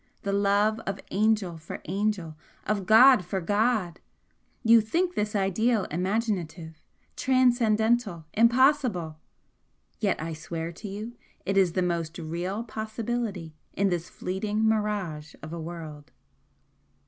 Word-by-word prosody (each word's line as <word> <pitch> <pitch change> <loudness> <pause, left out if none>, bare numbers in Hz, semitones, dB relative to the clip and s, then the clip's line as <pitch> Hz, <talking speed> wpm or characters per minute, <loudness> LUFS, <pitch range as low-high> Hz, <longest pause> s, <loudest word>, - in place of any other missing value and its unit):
the 200 - -1
love 205 +2 +2
of 195 0 -3
angel 205 -5 +1
for 155 - -8
angel, 190 -3 -2 0.3
of 205 -3 -1
god 245 +1 +7
for 190 +2 -3
god! 205 -2 0 0.6
You 230 -1 +7
think 345 - 0
this 210 -5 -2
ideal 205 +3 +1
imaginative, 180 -3 -2 0.3
transcendental 235 -7 +2
impossible! 235 - +3 0.8
yet 200 -4 0
I 160 +1 -4
swear 165 +1 -5
to 180 +5 -9
you 210 +4 -6 0.3
it 195 - -1
is 185 -4 +3
the 185 - +1
most 170 -2 -2
REAL 175 +6 -3
possibility 220 -5 -4 0.2
in 200 0 +1
this 175 -1 -2
fleeting 210 +4 -2
mirage 205 -8 -1
of 155 +1 -7
a 170 - -5
world!" 155 -3 -8
200 Hz, 125 wpm, -27 LUFS, 170-220 Hz, 0.8 s, god